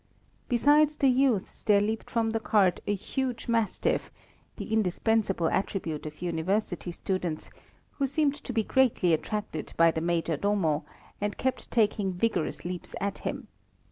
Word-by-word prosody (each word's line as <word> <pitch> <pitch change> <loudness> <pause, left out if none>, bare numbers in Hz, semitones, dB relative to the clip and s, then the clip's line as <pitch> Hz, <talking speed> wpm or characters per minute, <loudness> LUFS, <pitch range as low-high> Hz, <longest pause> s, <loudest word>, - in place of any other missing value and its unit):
Besides 290 +5 +4
the 275 -2 +3
youths, 255 -6 +1
there 205 -1 +4
leaped 220 +2 -2
from 225 -1 0
the 225 - 0
cart 200 -5 +3
a 205 - +2
huge 255 +5 -3
mastiff, 230 -3 0 0.5
the 220 - -5
indispensable 210 -3 +1
attribute 165 -6 -2
of 150 +3 -9
University 175 +2 -1
students, 175 -3 -3 0.5
who 275 - +2
seemed 280 +1 +1
to - - -5
be 225 -2 +1
greatly 235 -9 +3
attracted 210 +6 -3
by 165 0 +6
the 160 - -3
Major 165 -2 0
Domo, 190 -6 +1 0.4
and 205 0 -2
kept 260 0 -2
taking 205 -4 +1
vigorous 180 -4 -1
leaps 180 0 -5
at 200 0 -2
him. - - -4
205 Hz, 145 wpm, -28 LUFS, 175-230 Hz, 0.5 s, by